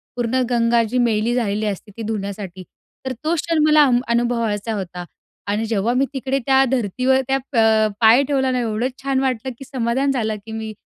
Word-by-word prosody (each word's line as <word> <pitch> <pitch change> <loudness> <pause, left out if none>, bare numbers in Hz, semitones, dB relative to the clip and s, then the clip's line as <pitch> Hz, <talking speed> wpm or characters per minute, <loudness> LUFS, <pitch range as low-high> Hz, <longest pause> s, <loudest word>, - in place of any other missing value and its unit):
पूर्ण 245 +1 0
गंगा 235 -1 +2
जी 250 - -1
मैली 230 -1 +1
झालेली 215 -3 -1
असते 205 0 -4
ती - - -6
धुण्यासाठी. 200 -3 -5 0.4
तर 260 - -2
तो 315 - +1
क्षण 330 0 -1
मला 305 -1 +6
अ, 260 - +2 0.2
अनुभवायचा 230 -2 0
होता. 180 -3 -6 0.4
आणि 210 +2 -1
जेव्हा 225 +1 0
मी 275 - +3
तिकडे 270 0 -1
त्या 270 -1 +4
धरतीवर 255 +2 +1
त्या 270 0 +2 0.2
प - - 0 0.4
पाय 230 +5 +6
ठेवला 265 -1 0
ना 255 - 0
एवढं 230 +1 -1 0.2
छान 275 -1 0
वाटलं 260 -1 -1
की 270 - -9
समाधान 260 +1 0
झालं 220 -4 -1
की 225 - -9
मी 220 -1 -5
235 Hz, 190 wpm, -20 LUFS, 215-265 Hz, 0.4 s, मला